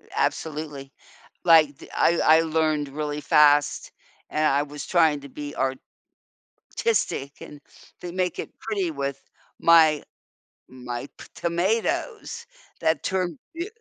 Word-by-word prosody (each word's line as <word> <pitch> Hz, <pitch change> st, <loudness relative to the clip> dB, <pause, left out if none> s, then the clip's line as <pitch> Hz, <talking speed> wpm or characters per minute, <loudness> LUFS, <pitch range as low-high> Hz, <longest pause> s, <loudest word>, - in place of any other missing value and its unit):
Absolutely. 150 Hz, -3 st, -3 dB, 0.5 s
Like, 155 Hz, -5 st, +5 dB
th -, -, -13 dB
I 170 Hz, 0 st, +3 dB, 0.2 s
I -, -, +3 dB
learned 155 Hz, -3 st, 0 dB
really 150 Hz, +1 st, -4 dB
fast, 145 Hz, -1 st, +3 dB, 0.4 s
and 155 Hz, 0 st, 0 dB
I 140 Hz, 0 st, +3 dB
was 145 Hz, 0 st, -8 dB
trying 160 Hz, -4 st, +3 dB
to 140 Hz, -, -11 dB
be 145 Hz, +1 st, -7 dB, 1.0 s
artistic 145 Hz, -, -2 dB
and 150 Hz, -, -11 dB, 0.4 s
then 175 Hz, 0 st, -7 dB
make 180 Hz, -1 st, -1 dB
it -, -, -5 dB
pretty 200 Hz, -6 st, -2 dB
with 140 Hz, -2 st, -4 dB, 0.4 s
my 160 Hz, -3 st, +5 dB, 0.7 s
my 125 Hz, 0 st, -7 dB
p -, -, -11 dB
tomatoes 225 Hz, -, -1 dB, 0.4 s
that 160 Hz, -3 st, +1 dB
turn 180 Hz, -5 st, -1 dB, 0.2 s
beau 345 Hz, +4 st, -3 dB
155 Hz, 120 wpm, -24 LUFS, 145-175 Hz, 1.0 s, Like